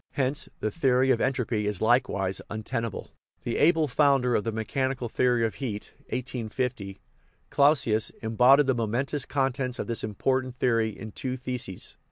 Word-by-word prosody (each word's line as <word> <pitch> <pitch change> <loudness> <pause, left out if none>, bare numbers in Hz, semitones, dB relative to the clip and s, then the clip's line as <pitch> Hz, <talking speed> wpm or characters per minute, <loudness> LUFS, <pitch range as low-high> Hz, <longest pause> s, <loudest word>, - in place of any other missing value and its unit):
Hence 135 0 -1
the 110 - -1
theory 130 -3 +2
of 120 - +2
entropy 120 -6 0
is 105 -3 -1
likewise 110 -5 +1
un 110 0 -5
tenable. 115 -3 -4 0.3
The 120 - -2
able 160 0 +4
founder 135 -2 +3
of 105 - +1
the 115 - -2
mechanical 125 +3 -2
theory 120 0 +2
of 110 - -2
heat 105 -6 -5 0.2
(1850), 120 -4 -4 0.5
Clausius, 135 -7 +3
embodied 125 +6 +5
the 130 - +2
momentous 125 +5 -1
contents 135 -2 -1
of - - -3
this 115 -1 -2
important 130 +4 -1
theory 115 -3 +2
in 110 0 -8
two 130 +4 -4
theses. 125 -7 -5
125 Hz, 155 wpm, -27 LUFS, 110-135 Hz, 0.5 s, embodied